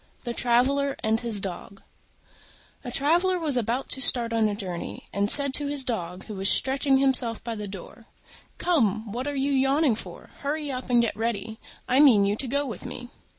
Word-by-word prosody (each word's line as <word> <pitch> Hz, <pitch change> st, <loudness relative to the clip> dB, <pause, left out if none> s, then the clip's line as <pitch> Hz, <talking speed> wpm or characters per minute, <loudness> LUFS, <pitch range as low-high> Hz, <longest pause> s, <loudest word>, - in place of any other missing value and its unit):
THE 240 Hz, -, -4 dB
TRAVELLER 270 Hz, +4 st, +1 dB
AND 220 Hz, +1 st, +1 dB
HIS 230 Hz, -3 st, +3 dB
DOG 195 Hz, +1 st, -7 dB, 1.0 s
A 245 Hz, -, -7 dB
Traveller 345 Hz, +8 st, +1 dB
was 310 Hz, -6 st, -1 dB
about 245 Hz, +2 st, -2 dB
to 265 Hz, -, -2 dB
start 240 Hz, -2 st, +2 dB
on 225 Hz, -1 st, +2 dB
a 205 Hz, -, -3 dB
journey, 185 Hz, -5 st, -7 dB
and 200 Hz, +1 st, -1 dB
said 280 Hz, 0 st, +8 dB
to 290 Hz, +1 st, +1 dB
his 285 Hz, -1 st, 0 dB
Dog, 185 Hz, -7 st, -5 dB
who 215 Hz, -, -8 dB
was 195 Hz, 0 st, 0 dB
stretching 270 Hz, 0 st, +3 dB
himself 260 Hz, -4 st, +2 dB
by 235 Hz, -, -5 dB
the 210 Hz, -2 st, -6 dB
door, 200 Hz, +4 st, -11 dB, 0.5 s
"Come, 225 Hz, -, 0 dB
what 250 Hz, +5 st, -5 dB
are 290 Hz, -, -4 dB
you 275 Hz, +1 st, -1 dB
yawning 270 Hz, +1 st, +2 dB
for? 215 Hz, -, -10 dB
Hurry 290 Hz, 0 st, -4 dB
up 255 Hz, -1 st, -6 dB
and 240 Hz, -1 st, +3 dB
get 230 Hz, -, -2 dB
ready: 220 Hz, 0 st, -4 dB, 0.3 s
I 255 Hz, -, +2 dB
mean 240 Hz, -9 st, +5 dB
you 200 Hz, +1 st, 0 dB
to 265 Hz, -, -4 dB
go 280 Hz, +3 st, -1 dB
with 240 Hz, -, -8 dB
me." 245 Hz, 0 st, -9 dB
245 Hz, 195 wpm, -25 LUFS, 220-275 Hz, 1.0 s, said